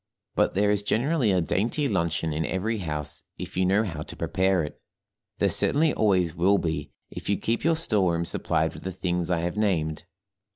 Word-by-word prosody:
But - - +1
there 105 +1 +3
is 105 -1 +1
generally 125 +4 +1
a 90 -1 +3
dainty 115 - 0
luncheon 85 - 0
in 80 +2 -1
every 105 +6 -1
house 75 -5 -5 0.2
if - - -7
you 95 0 +2
know 100 +4 +3
how 80 -8 -4
to - - -8
prepare 95 -2 +1
it; 75 - -8 0.6
there - - +2
certainly 155 +2 +2
always 90 -6 +2
will 95 +4 +3
be 80 -4 -2 0.2
if - - -7
you 100 - +2
keep 115 +1 -1
your 165 0 +3
store 105 - +1
room 85 0 -1
supplied - - 0
with - - -10
the 95 - -5
things 90 -1 -1
I 85 -2 +1
have 85 +4 -3
named. 85 -7 0
95 Hz, 200 wpm, -26 LUFS, 85-105 Hz, 0.6 s, there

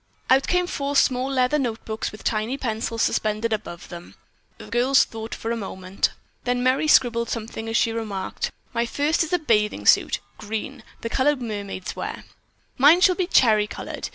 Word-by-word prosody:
Out 265 +1 +5
came 360 0 +2
four 285 -4 -3
small 260 -1 +3
leather 265 +2 +2
notebooks 225 -3 -3
and - - -6
with 210 - -11
tiny 220 +4 -1
pencils 230 -2 -2
suspended 215 +1 0
above 190 -5 -6
them, 175 -1 -10 0.4
the - - -11
girls 255 +3 +3
thought 225 0 -7
for 225 - -4
a - - 0
moment. 190 -3 -2 0.3
Then 245 0 0
Merry 260 +4 +2
scribbled 235 -5 +4
something 225 0 -5
as 225 - +1
she 230 - +2
remarked, 215 -4 -4 0.2
"My 235 0 0
first 295 +6 +1
is 320 - -6
a 360 - +3
bathing 215 -10 0
suit. - - +4 0.2
Green, 220 +4 -5 0.2
the 230 - -3
color 290 +3 +3
mermaids 205 -6 -5
wear." - - -5 0.6
"Mine 305 +7 +7
shall 370 -1 +6
be 365 -1 -1
cherry 215 - +4
colored. - - -6
235 Hz, 180 wpm, -23 LUFS, 215-270 Hz, 0.6 s, Mine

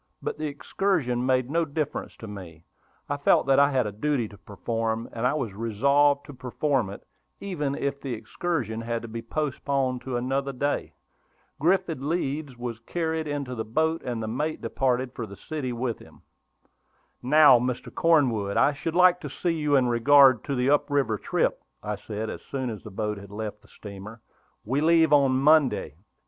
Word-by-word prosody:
But - - -5
the 155 - -1
excursion 145 -4 -1
made 130 0 +1
no 170 +1 +2
difference 150 -1 -4
to 110 - -9
me; 90 -5 -10 0.4
I 145 - -2
felt 145 - +3
that 135 0 +4
I 140 0 +5
had 130 -4 +1
a 105 - -3
duty 120 +2 -1
to 100 - -14
perform, 115 +2 -3
and 115 +2 0
I 140 - 0
was 125 -9 -3
resolved 140 +7 +2
to 145 - -10
perform 130 -2 -1
it, 100 - -10 0.3
even 150 -8 -3
if 140 0 -3
the 130 -4 -3
excursion 115 - -3
had 115 0 -3
to - - -6
be 115 +1 -6
postponed 135 -1 -2
to 130 -2 -3
another 135 +3 -1
day. 145 +3 -2 0.6
Griffin 165 -4 +1
Leeds 145 -5 -2
was 120 -2 -5
carried 160 +4 -2
into 140 -3 -3
the 110 -2 -3
boat, 160 +9 0
and 120 -3 -4
the - - -3
mate 150 +8 -2
departed 130 -1 -1
for 115 - -5
the 100 - -11
city 150 -5 -4
with 120 -1 -3
him. - - -17 1.0
"Now, 145 -1 +7
Mr. 125 0 -3
Cornwood, 125 -12 +2
I 145 - +4
should 160 +4 -4
like 180 0 +6
to - - -6
see 175 -2 -1
you 150 -3 +1
in 130 -2 +4
regard 130 +1 +6
to 140 - -2
the 125 +2 +2
up 145 - +2
river 135 -7 +1
trip," - - 0 0.2
I 105 0 -2
said, 105 +2 -5
as - - -6
soon 130 -3 -4
as 110 - -7
the - - -10
boat 105 0 -3
had 100 -1 -12
left 105 0 -6
the - - -22
steamer. 105 +2 -11 0.4
"We 130 +6 0
leave 160 -1 +4
on 140 -2 +5
Monday." 140 - +3
130 Hz, 185 wpm, -26 LUFS, 115-145 Hz, 1.0 s, Now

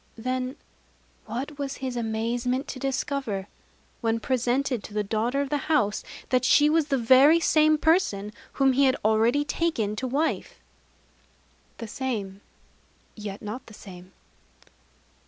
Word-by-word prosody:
Then 255 +3 -3 0.7
what 270 +6 -5
was 275 -1 -3
his 260 -1 -5
amazement 240 +4 -1
to 260 - -6
discover, 270 -7 -2 0.5
when 230 0 0
presented 250 0 0
to 210 - -10
the 210 - +1
daughter 225 +6 0
of 280 - -3
the 290 -2 -2
house, 210 -10 +2 0.3
that 255 0 +2
she 295 +3 +5
was 320 -2 +2
the 275 - +1
very 265 +7 +6
same 310 -1 +4
person 300 - +1 0.2
whom 270 -1 +3
he 275 +2 +4
had 260 0 +3
already 225 +6 +3
taken 290 -10 -1
to 260 - -2
wife! 290 +6 -2 1.2
_The 230 - -7
same, 210 -6 -4 0.7
yet 210 -2 -7
not 235 +5 -6
the 220 - -12
same. 185 -2 -12
255 Hz, 140 wpm, -26 LUFS, 220-280 Hz, 1.2 s, very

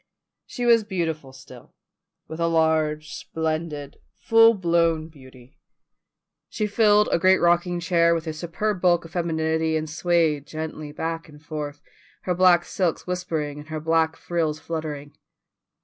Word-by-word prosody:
She 245 - -4
was 230 -2 +5
beautiful 165 -8 -3
still, 130 - -15 0.5
with 160 - -8
a 170 - +1
large, 155 -2 +1
splendid, 155 -3 -4 0.2
full 225 0 +5
blown 170 -3 +1
beauty; 130 -4 -17 0.9
she 215 - -2
filled 210 0 +4
a - - +2
great 185 +2 +5
rocking 175 +1 +2
chair 170 -1 +3
with 165 0 -4
her 160 - -3
superb 180 +5 -3
bulk 175 -2 +3
of 165 - -12
femininity, 160 -2 0
and 155 0 -3
swayed 160 -2 0
gently 155 -1 -6
back 165 +2 -4
and 150 0 -14
forth, 150 -2 -6 0.4
her 180 - 0
black 175 -1 +4
silks 180 -4 -1
whispering 160 -5 -3
and 150 +1 -12
her 155 0 -4
black 160 0 +1
frills 160 -3 -2
fluttering. 155 -3 -6
165 Hz, 145 wpm, -24 LUFS, 155-175 Hz, 0.9 s, was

